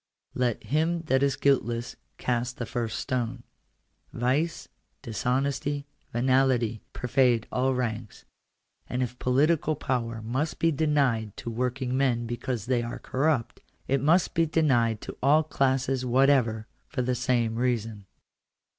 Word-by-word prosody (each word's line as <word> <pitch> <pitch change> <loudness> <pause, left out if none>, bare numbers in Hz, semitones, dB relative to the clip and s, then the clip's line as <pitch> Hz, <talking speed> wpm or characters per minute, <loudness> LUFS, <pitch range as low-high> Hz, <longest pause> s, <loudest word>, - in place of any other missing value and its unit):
Let 125 -3 -1
him 165 +3 0
that 135 -4 +2
is 140 -1 +2
guiltless 120 -4 0 0.2
cast 125 0 -1
the 120 - -3
first 115 -2 -3
stone. 125 -1 -2 0.7
Vice, 140 +7 -1 0.4
dishonesty, 135 +5 -1 0.3
venality, 125 -2 +2
pervade 125 -2 +2
all 130 +1 +1
ranks; 115 -3 -4 0.6
and 125 +1 -1
if 125 0 -5
political 150 +4 +2
power 115 -5 -2
must 130 +8 -2
be 165 - +2
denied 140 -8 +1
to 115 - -5
working 125 +2 -2
men 125 -3 +1
because 120 -1 -3
they 125 -1 +1
are 120 0 -5
corrupt, 130 -3 -1 0.3
it 135 0 +1
must 165 +6 +3
be 165 0 +2
denied 120 -9 +2
to - - -7
all 150 +4 +5
classes 135 -3 0
whatever 125 -3 +3 0.2
for 125 - -2
the 125 +1 0
same 120 -2 +1
reason. 115 -5 -1
125 Hz, 130 wpm, -27 LUFS, 120-140 Hz, 0.7 s, all